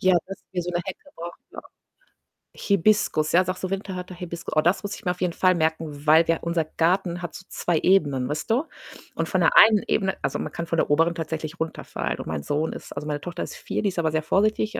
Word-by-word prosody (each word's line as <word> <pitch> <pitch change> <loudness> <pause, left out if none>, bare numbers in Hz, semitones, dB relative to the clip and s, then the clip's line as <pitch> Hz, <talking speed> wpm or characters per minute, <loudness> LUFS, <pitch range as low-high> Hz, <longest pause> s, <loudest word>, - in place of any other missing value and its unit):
Ja, 185 -1 +4
das 195 - -7
ist - - -41
wie 180 - -1
so 180 - -4
'ne 175 0 -1
Hecke, 240 +9 -8
brauchen 170 +1 -8
wir - - -14
auch. - - -9 0.9
Hibiskus, 200 -6 +2
ja, 185 +2 +6
sagst 185 +1 -4
du, 185 - -1
winterharte 190 -2 -4
Hibiskus. 170 -2 -6
Oh, 155 - +5
das 175 +4 +2
muss 205 0 -4
ich - - -13
mir 180 - +1
auf 180 - -6
jeden 180 -2 0
Fall 185 -1 +3
merken, 160 -2 -2
weil 160 +2 +7
wir 165 - +3
unser 170 -1 0
Garten 175 +3 0
hat 175 - -6
so 185 - -9
2 170 -3 0
Ebenen, 145 -9 +2
weißt 150 +2 -3
du? 240 +6 +3 0.5
Und - - -1
von - - +1
der - - +4
einen 215 -1 +8
Ebene 190 -2 +1
also, 135 - -1
man - - -5
kann 170 - -4
von 165 - -2
der - - +1
oberen 165 +3 +3
tatsächlich 160 -1 -4
runterfallen 160 0 -3
und - - -6
mein 80 -2 -3
Sohn 150 +2 -1
ist - - -9
also, 150 +1 -5
meine 145 -1 -2
Tochter 175 +2 -5
ist - - -7
4, - - -3
die 205 - +1
ist 180 - -4
aber 160 -2 +1
sehr 155 0 0
vorsichtig, 215 +5 +1
170 Hz, 250 wpm, -24 LUFS, 160-185 Hz, 0.9 s, einen